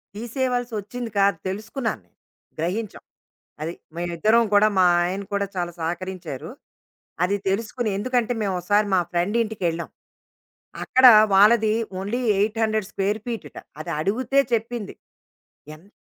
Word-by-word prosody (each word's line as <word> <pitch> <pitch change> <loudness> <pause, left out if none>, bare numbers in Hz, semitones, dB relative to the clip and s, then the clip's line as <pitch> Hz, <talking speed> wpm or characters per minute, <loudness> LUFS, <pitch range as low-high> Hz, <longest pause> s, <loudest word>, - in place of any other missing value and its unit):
తీసేయవలసి 245 +1 -2
వచ్చింది 230 +4 -6
కాదు 195 -3 +3
తెలుసుకున్నాను 220 +5 -3
నేను, - - -39 0.4
గ్రహించాం. 195 +6 -3 0.6
అది 160 +2 -3 0.2
మేమిద్దరం 175 +7 +2
గూడా, 205 +1 +6
మా 185 - +6 0.2
ఆయన 190 +3 -2
కూడా 200 0 +1
చాలా 175 -1 -2
సహకరించారు. 175 -3 -5 0.7
అది 190 +3 +1
తెలుసుకుని 225 +3 -2
ఎందుకంటే 245 +2 0
మేము 195 -3 -1
ఒసారి 205 +3 +2
మా 185 - +4
ఫ్రెండింటికెళ్ళాం. 180 -2 -1 0.9
అక్కడ 260 0 +4 0.3
వాళ్ళది 215 +2 +5 0.3
ఓన్లీ 205 +6 -2 0.2
800 215 -1 0
స్క్వేర్ 200 +2 -1
ఫీటట. 215 -11 -6 0.2
అది - - -6
అడుగితే 255 - +1
చెప్పింది. 230 -1 -2 0.8
ఎంత 170 +6 -20
205 Hz, 115 wpm, -23 LUFS, 185-230 Hz, 0.9 s, గూడా